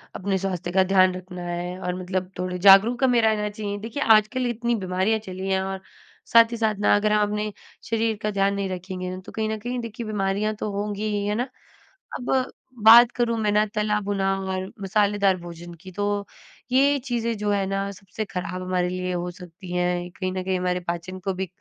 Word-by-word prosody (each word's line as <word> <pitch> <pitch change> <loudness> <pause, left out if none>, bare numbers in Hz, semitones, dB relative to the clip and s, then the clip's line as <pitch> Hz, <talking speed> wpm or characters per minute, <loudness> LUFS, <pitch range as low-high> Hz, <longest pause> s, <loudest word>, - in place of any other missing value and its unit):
अपने 195 0 -1
स्वास्थ्य 185 -2 -3
का 190 +1 +4
ध्यान 185 -1 +4
रखना 180 -1 -8
है 175 +1 -4
और 180 -1 -3
मतलब 185 0 -3
थोड़े 180 0 -2
जागरूक 205 +7 +6
हमें 245 -2 +4
रहना 215 -1 +2
चाहिए। 205 -1 -4
देखिए, 230 +7 -3
आजकल 225 +3 +4
इतनी 240 0 -1
बीमारियाँ 190 +2 0
चली 190 -2 -6
हैं 190 0 +2
और 190 0 -4 0.5
साथ 230 0 +7
ही 235 - -3
साथ 220 -2 +1
ना, 205 - +4
अगर 210 +1 +1
हम 210 -1 +3
अपने 210 0 -2 0.3
शरीर 225 -1 0
का 210 -1 -1
ध्यान 200 0 +1
नहीं 200 -1 -2
रखेंगे 185 0 -5
ना, 185 - -5
तो - - -12
कहीं 220 -1 -2
न 220 - -2
कहीं 245 +3 -3
देखिए 230 0 -6
बीमारियाँ 210 +1 -1
तो 210 0 -4
होंगी 205 +1 -3 0.2
ही। 200 - -3
है 210 - 0
ना? 250 +3 -2 0.7
अब 245 - -3 0.5
बात 235 +2 +9
करूँ 235 -1 +1
मैं 210 -1 +1
ना 210 +1 +3
तला-भुना 205 -2 0 0.2
और 190 0 -4
मसालेदार 200 -1 +2
भोजन 175 0 -9
की 185 -1 -10
तो 205 +1 -1 0.5
ये 280 +2 +4
चीज़ें 235 -3 -1
जो 210 0 -1
हैं 200 -1 +1
ना, 195 0 -2
सबसे 200 +2 -6
खराब 185 -1 -5
हमारे 180 -1 0
लिए 185 0 -3
हो 180 0 -2
सकती 180 0 -11
हैं। 180 0 +1
ये 175 - -8
कहीं 185 +1 -4
न 185 -1 -3
कहीं 185 0 0
हमारे 180 0 0
पाचन 175 +2 -4
को 190 +1 -2
भी 190 0 -3
200 Hz, 210 wpm, -24 LUFS, 185-215 Hz, 0.7 s, बात